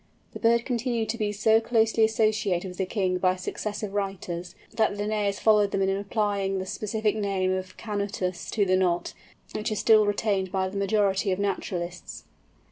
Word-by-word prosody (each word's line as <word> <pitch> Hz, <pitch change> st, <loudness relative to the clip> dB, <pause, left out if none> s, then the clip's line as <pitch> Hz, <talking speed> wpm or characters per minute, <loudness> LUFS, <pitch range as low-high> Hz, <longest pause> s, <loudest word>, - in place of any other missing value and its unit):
The -, -, -7 dB
bird 230 Hz, 0 st, +3 dB
continued 240 Hz, -2 st, -1 dB
to 230 Hz, -, -1 dB
be 210 Hz, -1 st, 0 dB
so 220 Hz, +2 st, +3 dB
closely 225 Hz, -1 st, +2 dB
associated 215 Hz, -4 st, +1 dB
with 180 Hz, -, -11 dB
the 190 Hz, -, 0 dB
king 185 Hz, -3 st, 0 dB
by 185 Hz, 0 st, +2 dB
successive 205 Hz, +2 st, -4 dB
writers, 185 Hz, -3 st, -4 dB, 0.2 s
that 220 Hz, -2 st, +1 dB
Linnæus 205 Hz, -1 st, -1 dB
followed 210 Hz, -2 st, +4 dB
them 195 Hz, 0 st, 0 dB
in 190 Hz, -, +2 dB
applying 200 Hz, -1 st, -1 dB
the 185 Hz, -, -3 dB
specific 215 Hz, +2 st, -1 dB
name 195 Hz, -3 st, 0 dB
of 185 Hz, 0 st, -5 dB
canutus 200 Hz, -4 st, -3 dB
to 205 Hz, -3 st, +1 dB
the 185 Hz, -1 st, +3 dB
Knot, 180 Hz, -2 st, 0 dB, 0.4 s
which 215 Hz, +1 st, -2 dB
is 215 Hz, -, -1 dB
still 215 Hz, -1 st, +5 dB
retained 200 Hz, -3 st, 0 dB
by 190 Hz, -1 st, 0 dB
the 200 Hz, -, -6 dB
majority 200 Hz, -1 st, +1 dB
of 185 Hz, -, 0 dB
naturalists. 180 Hz, -3 st, -4 dB
200 Hz, 175 wpm, -26 LUFS, 190-215 Hz, 0.4 s, still